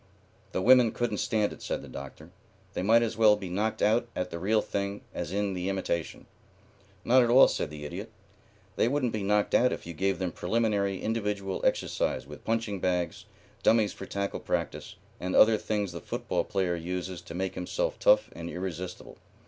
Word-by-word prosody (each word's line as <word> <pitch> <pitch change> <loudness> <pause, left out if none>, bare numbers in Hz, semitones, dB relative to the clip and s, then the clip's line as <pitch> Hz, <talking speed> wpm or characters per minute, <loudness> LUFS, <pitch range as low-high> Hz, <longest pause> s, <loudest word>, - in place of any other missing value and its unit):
"The 95 - -1
women 125 -1 +6
couldn't 115 -4 -1
stand 105 -2 +1
it," - - -14
said - - -3
the - - -10
Doctor. 70 0 -9 0.4
"They - - -2
might 115 +5 +5
as 115 -2 -2
well 110 -2 +6
be 100 -3 -7
knocked 105 +5 -1
out 115 +3 +3
at 90 0 -3
the 85 - -5
real 105 +4 +2
thing 100 0 -3
as 75 - -4
in 100 0 -1
the 90 +1 -2
imitation." 95 -4 -3 0.8
"Not 130 +2 +6
at 120 - +2
all," 130 +3 +8
said 80 - -2
the 75 -1 -8
Idiot. 75 - -6 0.7
"They - - +3
wouldn't 130 -2 0
be 110 - -2
knocked 105 +1 +1
out 125 +1 +4
if - - -5
you 85 - -6
gave 95 +4 0
them 90 -1 -2
preliminary 100 -2 0
individual 105 -3 -2
exercise - - 0
with 75 +1 -11
punching 115 -3 -1
bags, 90 -1 -1 0.4
dummies 110 -2 +3
for - - -9
tackle 100 0 -3
practice, - - -3 0.2
and 90 +1 -2
other 110 0 +7
things 105 -3 -2
the 85 -1 -7
football - - -2
player 95 -4 0
uses 90 +1 -4
to 85 - -9
make 95 +1 -2
himself - - -2
tough - - +4
and 85 - -6
irresistible." 90 0 -6
100 Hz, 190 wpm, -28 LUFS, 90-110 Hz, 0.8 s, all